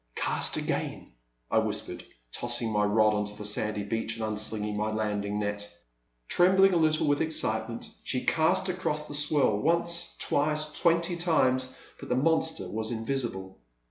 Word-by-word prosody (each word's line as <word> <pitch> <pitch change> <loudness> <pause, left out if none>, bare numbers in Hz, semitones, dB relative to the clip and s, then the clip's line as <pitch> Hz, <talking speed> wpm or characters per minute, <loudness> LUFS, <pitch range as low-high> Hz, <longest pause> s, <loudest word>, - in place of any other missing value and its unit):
'*Cast - - +1
again," - - -3 0.4
I - - +4
whispered, - - -3 0.3
tossing 120 -1 -2
my 105 -1 +2
rod 105 +1 +3
onto 105 0 -2
the 105 0 -7
sandy 105 0 -1
beach 115 +2 -2
and 110 - -2
unslinging 105 0 -2
my 105 +1 -1
landing 105 -1 -2
net. 105 0 -3 0.6
Trembling 190 +2 +5
a - - +3
little 155 -1 +3
with 145 -1 +2
excitement 115 -7 -1
she 125 - -2
cast 185 +4 +2
across 165 -5 -2
the - - -8
swirl, 145 -7 +2
once, 170 +4 +1
twice, 150 +1 0
twenty 170 +2 +1
times, 130 -7 +1 0.2
but - - -9
the 125 - +2
monster 160 - +1
was 110 +3 -1
invisible. 115 - -3
120 Hz, 150 wpm, -28 LUFS, 105-160 Hz, 0.6 s, Trembling